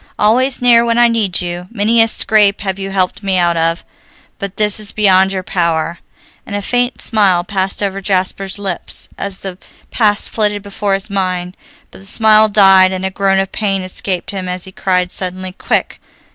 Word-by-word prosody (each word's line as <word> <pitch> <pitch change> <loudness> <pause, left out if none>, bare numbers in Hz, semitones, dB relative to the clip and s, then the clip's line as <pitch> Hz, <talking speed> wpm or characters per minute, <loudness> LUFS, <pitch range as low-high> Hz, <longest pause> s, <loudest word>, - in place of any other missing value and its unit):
"Always 250 +5 +2
near 235 -1 +5
when 235 0 0
I 240 0 +5
need 215 -7 0
you. 175 0 -5
Many 225 +1 +2
a 225 - +4
scrape 210 -2 +3
have 195 -1 -3
you 195 0 -5
helped 190 -1 -1
me 195 -2 -1
out 175 -1 +2
of, 165 +1 -1 0.5
but 200 -1 -6
this 210 0 +3
is 210 -1 +2
beyond 190 -2 +3
your 190 -1 -3
power," 170 -1 -1 0.4
and 205 - -7
a 205 - -2
faint 245 +3 -1
smile 195 -6 +2
passed 190 +1 -2
over 195 0 -3
Jasper's 195 0 -2
lips 195 -3 -4
as 195 -1 -6
the 190 -1 -7 0.3
past 210 -3 +1
flitted 210 -2 -1
before 200 -1 -2
his 195 +2 -3
mind. 185 -2 -2 0.4
But - - -14
the 195 - -9
smile 215 0 +4
died, 195 -2 +5
and 190 0 -4
a 190 - -2
groan 195 0 +1
of 195 0 -1
pain 195 -3 -1
escaped 185 0 -4
him 190 -2 -5
as 180 0 -4
he 190 - -9
cried 180 -1 -1
suddenly, 185 0 -5
"Quick! 185 - -2
195 Hz, 190 wpm, -15 LUFS, 185-210 Hz, 0.5 s, near